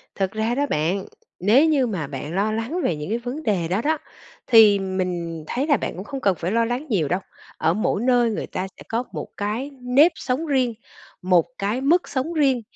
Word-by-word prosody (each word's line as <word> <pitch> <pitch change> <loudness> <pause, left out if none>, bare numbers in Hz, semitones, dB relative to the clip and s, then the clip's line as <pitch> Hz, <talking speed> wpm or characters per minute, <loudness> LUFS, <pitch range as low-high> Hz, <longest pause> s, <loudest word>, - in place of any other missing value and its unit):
Thật 190 -1 -1
ra 220 +3 -1
đó 285 +2 +1
bạn, 175 +6 0 0.3
nếu 220 - +5
như 290 -5 +3
mà 180 -10 -3
bạn 145 +3 -6
lo 205 +3 +1
lắng 230 +11 -2
về 170 - +1
những 150 +3 -6
cái 225 - 0
vấn 255 +6 -5
đề 190 - 0
đó 185 +6 0
đó, 310 +3 +1 0.5
thì 220 -4 +7
mình 180 -4 -3
thấy 270 +4 -1
là 290 -4 +4
bạn - - -4
cũng 185 - -6
không 275 +4 -6
cần 195 -5 +2
phải 170 +3 -2
lo 230 +1 +2
lắng 245 +5 -2
nhiều 180 - +1
đâu. 180 +6 0 0.4
Ở - - +2
mỗi 210 +1 0
nơi 245 -1 +3
người 215 - -3
ta 185 - -4
sẽ - - -12
có 230 +2 0
một - - -5
cái 220 +8 -3
nếp 265 +7 +5
sống 265 +6 -2
riêng, 260 -5 +1 0.5
một 180 -2 +3
cái 210 +6 -1
mức 335 +6 +2
sống 285 +5 -2
riêng. 275 -6 +2
225 Hz, 220 wpm, -23 LUFS, 185-260 Hz, 0.5 s, thì